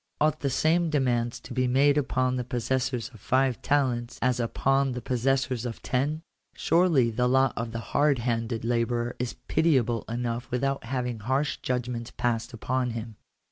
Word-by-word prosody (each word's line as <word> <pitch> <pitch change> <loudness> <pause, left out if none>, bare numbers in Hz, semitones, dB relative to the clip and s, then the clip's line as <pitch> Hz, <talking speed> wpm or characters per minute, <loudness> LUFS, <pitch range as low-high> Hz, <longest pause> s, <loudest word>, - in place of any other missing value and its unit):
Ought 155 -1 +2
the 140 - -1
same 160 +6 +2
demands 120 -5 0
to - - -9
be 130 0 +1
made 140 +3 +4
upon 130 -3 +1
the 125 - -1
possessors 125 0 -1
of 115 - -13
five 130 +2 +1
talents 125 -4 0
as 125 -1 +1
upon 135 +3 +1
the 125 - -3
pos 125 0 -2
sessors 130 -1 +1
of 120 -2 -6
ten? 145 +5 -1 0.3
Surely 165 -9 +3
the 125 +2 +1
lot 130 0 +3
of 115 0 -3
the 115 - -4 0.2
hard 145 -1 +4
handed 115 -1 -2
labourer 120 0 0
is 125 -1 -3
pitiable 130 -8 +2
enough 120 0 -3
without 135 +1 -1
having 125 -2 -2
harsh 135 +6 0
judgments 125 -1 -3
passed 120 -2 -1
upon 125 +2 -1
him. 115 -1 -6
125 Hz, 170 wpm, -27 LUFS, 120-135 Hz, 0.3 s, made